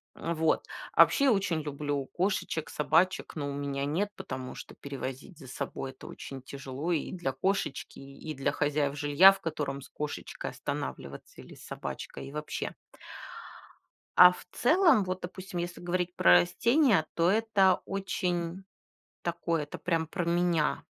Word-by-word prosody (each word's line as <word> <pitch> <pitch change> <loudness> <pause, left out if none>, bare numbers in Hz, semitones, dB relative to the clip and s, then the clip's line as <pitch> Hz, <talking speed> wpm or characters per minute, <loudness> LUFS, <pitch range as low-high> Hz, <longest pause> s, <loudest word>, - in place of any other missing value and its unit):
А 170 - -3
вот, 160 -1 +1 0.3
а - - +7
вообще 280 -1 +5
очень 190 -8 +1
люблю 145 -1 -3
кошечек, 180 -3 -1
собачек, 165 +5 +1
но 145 -2 -3
у - - -4
меня 140 -1 -2
нет, 175 +8 0
потому 130 -6 -6
что - - -10
перевозить 135 +4 -7
за 135 - -12
собой 130 +1 -5
это 130 - -13
очень 135 -1 -8
тяжело 135 +4 -5
и 160 -4 -1
для 175 -8 -3
кошечки, 185 -1 -2
и 140 +3 -9
и - - -3
для 135 -1 0
хозяев 145 -1 0
жилья, 145 +6 +7
в 195 - -11
котором 145 -4 -3
с - - -13
кошечкой 150 -1 -5
останавливаться 70 0 -6
или - - -13
с - - -14
собачкой - - -6
и - - -9
вообще. 150 +1 -4 1.4
А 180 - +11
в - - -11
целом, 310 - +4
вот, 185 0 -3
допустим, 185 0 -6
если 175 +1 -4
говорить 180 0 -2
про 90 - +5
растения, 235 - +3
то 170 +1 +3
это 205 -3 +3
очень 180 -2 -2 0.6
такое, 170 -2 -1
это 145 - -8
прям 165 -1 0
про 175 +3 -3
меня. 170 -2 +1
165 Hz, 155 wpm, -29 LUFS, 140-185 Hz, 1.4 s, А